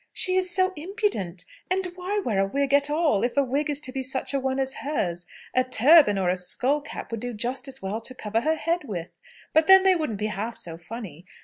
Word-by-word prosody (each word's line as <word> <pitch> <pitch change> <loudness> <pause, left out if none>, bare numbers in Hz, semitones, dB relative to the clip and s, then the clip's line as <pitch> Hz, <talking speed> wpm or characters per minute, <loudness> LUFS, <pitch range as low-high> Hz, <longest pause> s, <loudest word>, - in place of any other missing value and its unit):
"She 370 - 0
is 370 -1 +1
so 370 +1 +2
impudent! 325 - -2 0.2
And 375 +1 0
why 365 +3 -3
wear 235 - 0
a 195 - +3
wig 280 +5 -1
at 285 0 +4
all, 300 -9 +1
if 245 +3 -1
a 280 - +5
wig 280 +4 -1
is 290 -1 +2
to 260 - -3
be 265 0 -3
such 260 +1 -1
a 275 - +1
one 265 0 -1
as 265 0 0
hers? 175 - -2 0.3
A 255 - +3
turban 255 -2 +6
or 190 -2 0
a 185 - -1
skull 255 +11 0
cap 295 - -8
would 230 - -3
do 245 0 -5
just 245 +6 -2
as 270 -3 -2
well 205 +4 -3
to 255 +3 -8
cover 220 -1 -2
her 315 +5 +1
head 335 +2 -1
with. 175 -7 -7 0.3
But 315 0 +4
then 385 0 +8
they 380 -1 +5
wouldn't 305 - -2
be 210 - -2
half 220 +4 -4
so 165 -1 -3
funny. 175 -2 -9
265 Hz, 240 wpm, -25 LUFS, 210-315 Hz, 0.3 s, then